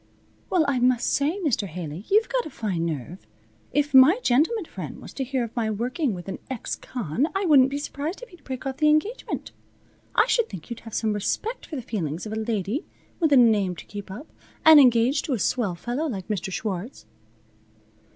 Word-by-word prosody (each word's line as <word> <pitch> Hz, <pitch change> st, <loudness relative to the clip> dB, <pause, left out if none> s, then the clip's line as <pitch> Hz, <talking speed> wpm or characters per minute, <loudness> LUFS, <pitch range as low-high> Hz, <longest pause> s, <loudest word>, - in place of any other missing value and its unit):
"Well 350 Hz, -4 st, +3 dB
I 270 Hz, -3 st, +1 dB
must 245 Hz, -1 st, +2 dB
say, 300 Hz, +8 st, +1 dB
Mr. 220 Hz, -8 st, +1 dB
Haley, 170 Hz, +1 st, -7 dB
you've 430 Hz, +3 st, +4 dB
got -, -, -1 dB
a -, -, -8 dB
fine 190 Hz, -, -2 dB
nerve! 155 Hz, -, -6 dB, 0.4 s
If 290 Hz, 0 st, 0 dB
my 265 Hz, +9 st, +8 dB
gentleman 330 Hz, -, +2 dB
friend -, -, -8 dB
was -, -, -11 dB
to 270 Hz, -, -3 dB
hear 260 Hz, -1 st, -1 dB
of 230 Hz, -, -7 dB
my 225 Hz, -3 st, 0 dB
working 245 Hz, -, -1 dB
with 175 Hz, +1 st, -9 dB
an 195 Hz, -, -5 dB
ex 260 Hz, -4 st, -3 dB
con 245 Hz, -, -2 dB
I 390 Hz, 0 st, 0 dB
wouldn't 275 Hz, -5 st, +6 dB
be 280 Hz, -, -3 dB
surprised 295 Hz, -, -5 dB
if -, -, -10 dB
he'd 355 Hz, -, -17 dB
break 260 Hz, 0 st, -6 dB
off 265 Hz, -1 st, -3 dB
the 305 Hz, -1 st, +4 dB
engagement. 355 Hz, +11 st, -1 dB, 0.6 s
I -, -, +5 dB
should 470 Hz, -2 st, +1 dB
think 190 Hz, +1 st, -9 dB
you'd 235 Hz, -, -5 dB
have -, -, -7 dB
some 220 Hz, -2 st, 0 dB
respect 425 Hz, -, -3 dB
for 310 Hz, -, -6 dB
the 255 Hz, -, -5 dB
feelings 170 Hz, -7 st, -3 dB
of 215 Hz, -, -5 dB
a -, -, -2 dB
lady 220 Hz, -, -2 dB, 0.4 s
with 320 Hz, -4 st, +2 dB
a 280 Hz, -, +7 dB
name 210 Hz, -7 st, +4 dB
to -, -, -11 dB
keep 205 Hz, -1 st, -8 dB
up, 215 Hz, +10 st, -8 dB, 0.4 s
and 315 Hz, -1 st, +10 dB
engaged 250 Hz, +2 st, +4 dB
to 295 Hz, -, -1 dB
a -, -, +1 dB
swell 205 Hz, -4 st, 0 dB
fellow 245 Hz, -, -3 dB
like 200 Hz, -, -5 dB
Mr. 195 Hz, -2 st, -2 dB
Schwartz." 205 Hz, +4 st, -4 dB
245 Hz, 210 wpm, -25 LUFS, 205-295 Hz, 0.6 s, and